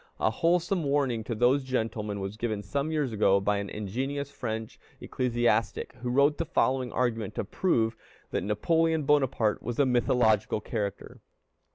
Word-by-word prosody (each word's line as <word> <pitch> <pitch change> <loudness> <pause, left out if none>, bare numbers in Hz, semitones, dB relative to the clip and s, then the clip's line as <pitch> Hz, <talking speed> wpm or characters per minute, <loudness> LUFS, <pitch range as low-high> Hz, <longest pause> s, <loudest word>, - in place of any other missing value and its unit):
A 110 - +2
wholesome 175 - +1
warning 140 -5 0
to 115 - -3
these 125 +5 +3
gentlemen 110 -5 -2
was 95 +1 -4
given 110 -2 -3
some 140 - -2
years 145 -6 -1
ago 100 -2 +4
by 105 +1 +1
an 100 0 -4
ingenious 135 +8 -3
French 110 -4 -5 0.2
ecclesiastic, 120 -3 0
who 125 - -2
wrote 140 +4 +3
the 165 - 0
following 130 -6 +1
argument 115 -5 -1
to - - -1
prove 115 - 0 0.4
that - - -1
Napoleon 160 +9 +1
Bonaparte 135 -6 +2
was 120 -1 -4
a 140 - +4
mythological 120 -4 +2
character. 105 -2 -5
120 Hz, 155 wpm, -28 LUFS, 110-140 Hz, 0.4 s, ago